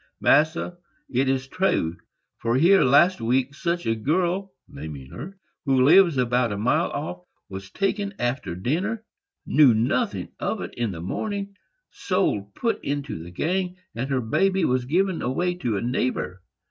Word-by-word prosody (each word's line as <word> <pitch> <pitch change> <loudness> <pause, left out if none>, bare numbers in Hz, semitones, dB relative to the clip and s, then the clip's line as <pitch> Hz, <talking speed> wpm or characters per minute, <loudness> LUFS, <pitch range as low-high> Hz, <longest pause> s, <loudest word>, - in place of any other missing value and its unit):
"Massa, 160 +3 +2 0.3
it 130 0 +1
is 135 0 0
true; 135 - 0 0.4
for 115 +1 0
here, 175 +8 +5
last 140 +5 +4
week, 130 +4 +1
such 170 +3 -2
a 115 - +2
girl 175 - 0 0.2
[naming 70 -4 -9
her], 180 +11 -8 0.3
who 135 -2 +3
lives 170 +1 +6
about 125 -2 +1
a 100 - -3
mile 110 +5 +1
off, 90 +1 -5 0.3
was 95 0 -8
taken 200 - -1
after 120 -8 -2
dinner,—knew 155 - +1
nothing 115 +3 0
of - - -2
it - - -6
in 120 -2 -2
the 85 -3 -7
morning,—sold, 200 - -3
put 230 - -1
into 140 - -3
the 85 - -9
gang, 180 - -2 0.2
and 120 +5 -4
her 130 -2 +1
baby 190 +11 +1 0.2
given 185 +4 +1
away 175 +9 0
to 120 - -2
a - - -2
neighbor. 120 -6 -2
135 Hz, 145 wpm, -24 LUFS, 115-185 Hz, 0.4 s, lives